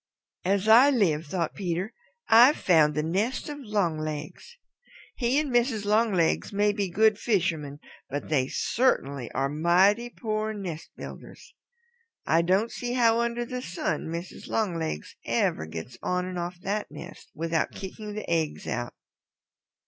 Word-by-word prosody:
"As 195 +2 +1
I 240 +6 +8
live," 170 - +1
thought 170 0 -2
Peter, 185 +2 -3 0.3
"I've 245 +6 +7
found 155 -4 +4
the 150 - 0
nest 200 - -1
of 290 0 -6
Longlegs! 165 - -3 0.6
He 245 +2 0
and 295 -3 0
Mrs. 240 -3 +1
Longlegs 210 -5 +2
may 205 +1 +2
be 200 -2 -2
good 215 +3 +3
fishermen 165 - -1 0.3
but 145 +1 -4
they 135 -4 +1
certainly 140 - 0
are 135 +1 0
mighty 180 +10 +3
poor 215 -2 -3
nest 175 -6 -6
builders. - - -10 0.7
I 165 +1 +3
don't 190 +7 +1
see 245 0 -4
how 230 -2 +4
under 235 0 -1
the 250 +1 -5
sun 180 -7 -3
Mrs. 170 +2 -6
Longlegs 165 - -2
ever 80 - 0
gets 80 +10 -8
on 180 0 -1
and 185 -1 -4
off 175 +1 -5
that 205 +2 -2
nest - - -11
without 165 0 0
kicking 210 +2 -8
the 215 - -5
eggs 160 -2 -1
out." 120 0 -3
190 Hz, 145 wpm, -27 LUFS, 160-225 Hz, 0.7 s, I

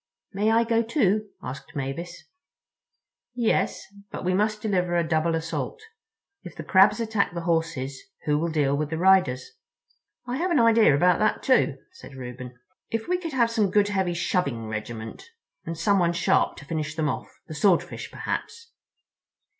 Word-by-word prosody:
"May 205 +3 +1
I 225 +1 +4
go, 230 0 +2
too?" 215 -4 +1
asked 140 +5 -8
Mavis. 145 +6 -5 1.1
"Yes. 235 -3 0 0.2
But - - -7
we 185 - +1
must 210 +2 +1
deliver 180 -5 0
a 170 -1 +1
double 160 0 +1
assault. 165 - -4 0.6
If - - -11
the - - -7
Crabs 195 +3 +5
attack 220 -5 0
the 170 - -3
Horses, 160 -6 -1 0.2
who 150 0 +2
will 170 +2 -1
deal 145 -3 +1
with 150 0 -2
the 160 - -3
riders?" 180 -9 +3 0.7
"I 250 +1 -3
have 360 +5 0
an 335 - +3
idea 230 -9 +5
about 180 +4 +3
that, 215 - +1
too," 260 - +3
said 370 - -13
Reuben. 125 -1 -8 0.3
"If 225 -1 -3
we 360 0 +1
could 330 -4 -6
have 235 -3 +2
some 215 -4 +1
good 205 +1 +3
heavy 190 -3 0
shoving 140 - -1
regiment—and 115 - -8
someone 175 0 +2
sharp 170 - +1
to 145 - -11
finish 155 0 -3
them 160 -2 0
off. 140 - -3 0.2
The - - -7
Swordfish, 180 +3 +1
perhaps?" 465 0 -5
180 Hz, 160 wpm, -25 LUFS, 150-220 Hz, 1.1 s, Crabs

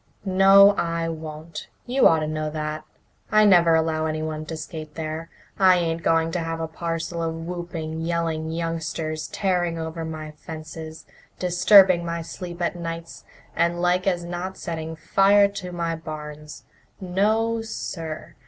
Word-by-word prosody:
"No, 195 +1 +7
I 165 0 -1
won't. 160 0 -7 0.2
You 255 +2 +4
ought 160 -1 +3
to 155 - -1
know 155 0 -2
that. 155 0 -4 0.5
I 215 0 +6
never 170 -4 +6
allow 160 -1 +1
anyone 155 0 -3
to 160 - -5
skate 155 -1 -8
there. 160 +1 -5 0.3
I 185 -2 +6
ain't 165 -1 -1
going 165 0 +2
to 175 - -1
have 165 0 -3
a 160 - -2
parcel 165 +1 -4
of 165 0 -2
whooping, 165 -2 -5
yelling 165 -1 -1
youngsters 160 -1 -3
tearing 175 -4 0
over 160 0 -4
my 155 -1 -6
fences, 160 0 -9 0.3
disturbing 180 0 +6
my 170 0 -3
sleep 175 +1 -6
at 170 - 0
nights, 165 -1 -7 0.3
and 170 +1 +1
like 180 +2 +1
as 175 -2 +1
not 175 +2 -5
setting 160 -2 -5
fire 200 +5 +4
to 195 -3 -7
my 170 -1 -2
barns. 150 -2 -8 0.4
No, 215 +5 +1
sir! 165 -7 -6
165 Hz, 150 wpm, -24 LUFS, 160-180 Hz, 0.5 s, No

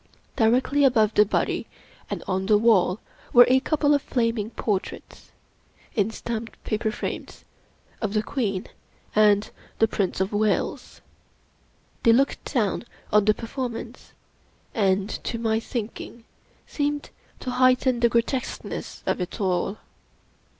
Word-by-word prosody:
Directly 255 +5 +3
above 225 -5 +4
the 210 -1 +5
body - - -1 0.4
and - - -4
on 190 0 -1
the 210 -1 +5
wall 205 -4 +3 0.3
were 245 0 +9
a 260 +1 +5
couple 295 +1 +2
of 285 - +2
flaming 230 -5 -1
portraits, 205 -4 -4 0.6
in 210 -2 +1
stamped 225 0 -5
paper 220 +1 -1
frames, 215 - -6 0.6
of 215 -1 -2
the 215 - +2
Queen 210 -7 -2 0.5
and 210 -1 +4 0.3
the 225 - +4
Prince 195 -4 -1
of 190 +2 -1
Wales. 210 0 -1 1.0
They 230 - +5
looked 275 +4 +1
down 230 -7 0 0.3
on 210 -1 +5
the 215 0 +4
performance, 240 0 -6 0.6
and, 195 -2 +2 0.2
to 230 - -3
my 225 -1 +1
thinking, 230 0 -6 0.4
seemed 290 0 -2 0.3
to 255 - -3
heighten 255 0 +3
the 235 0 +4
grotesqueness 235 +2 -2
of - - 0
it 180 - -5
all. 190 +1 0
225 Hz, 130 wpm, -25 LUFS, 210-250 Hz, 1.0 s, were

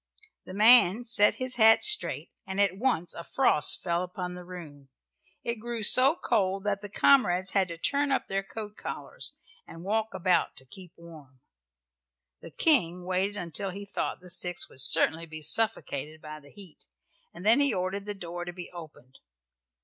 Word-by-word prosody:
The 185 - -10
man 225 0 +6
set 225 -3 +4
his 255 -1 -1
hat 225 - +6
straight 425 0 +3 0.2
and 190 +1 -5
at 200 -2 +2
once 195 -6 -1
a 170 - -8
frost 165 - +2
fell 170 -1 -1
upon 180 0 -6
the 180 0 -10
room. 155 -6 -12 0.5
It 235 -1 -4
grew 235 0 -6
so 260 +7 +5
cold 195 - -1
that 200 -1 -2
the 205 - -9
comrades 190 -6 +2
had 195 -2 +1
to 170 -1 -8
turn 285 - 0
up 265 - 0
their 195 0 -2
coat 210 +1 -9
collars - - -6 0.3
and 165 - -12
walk 215 +1 -2
about 185 -1 0
to 130 - -6
keep 180 +6 -15
warm. 155 -6 -15 1.0
The - - -12
King 180 - +1
waited 190 +3 -2
until 185 +2 -5
he 200 +2 -8
thought 200 - -5
the 180 -1 -6
six 180 -1 +1
would - - -5
certainly 165 +5 +2
be 155 -1 -10
suffocated 155 -6 -2
by 155 0 -10
the 140 -1 -19
heat, 185 -2 -15 0.4
and 175 +3 -12
then 230 +5 +4
he 280 -2 +2
ordered 195 +1 -4
the 205 - -5
door 175 -2 -7
to 175 - -7
be 175 0 -10
opened. 155 -7 -13
185 Hz, 180 wpm, -27 LUFS, 170-215 Hz, 1.0 s, man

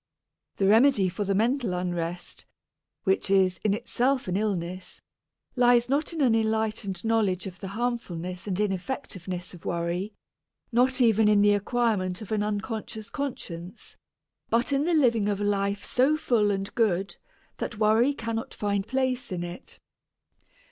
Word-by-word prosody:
The 195 - 0
remedy 220 -1 +5
for 190 +4 -3
the 195 0 0
mental 230 -2 +1
unrest, 175 -1 -4 0.6
which 190 0 +1
is 190 -2 +3
in 205 -2 +2
itself 250 +3 0
an 180 - -1
illness, 185 -3 -3 0.6
lies 245 -1 +4
not 290 +5 +1
in 325 -2 -3
an 250 -5 +4
enlightened 220 -3 -1
knowledge 210 -5 +1
of 185 -2 -8
the 195 - -6
harmfulness 190 -5 -4
and 190 -1 -2
ineffectiveness 190 - -3
of 175 - -13
worry, 175 +4 -2 0.6
not 255 +2 +3
even 225 -2 +4
in 210 -1 +5
the 205 0 +5
acquirement 205 -3 0
of 215 - -9
an 215 -1 +1
unconscious 215 +1 -4
conscience, 230 - -6 0.5
but 235 +4 +1
in 275 +2 +2
the 345 0 +2
living 230 -8 +3
of 200 -1 -1
a - - -2
life 200 0 0
so 270 +5 +2
full 230 -8 +2
and 195 -1 -2
good 195 -4 0 0.4
that 225 - -4
worry 220 +5 +4
cannot 230 -1 -4
find 200 -1 -1
place 260 -2 -1
in 175 -1 -3
it. 175 +1 -8
210 Hz, 150 wpm, -27 LUFS, 190-240 Hz, 0.6 s, remedy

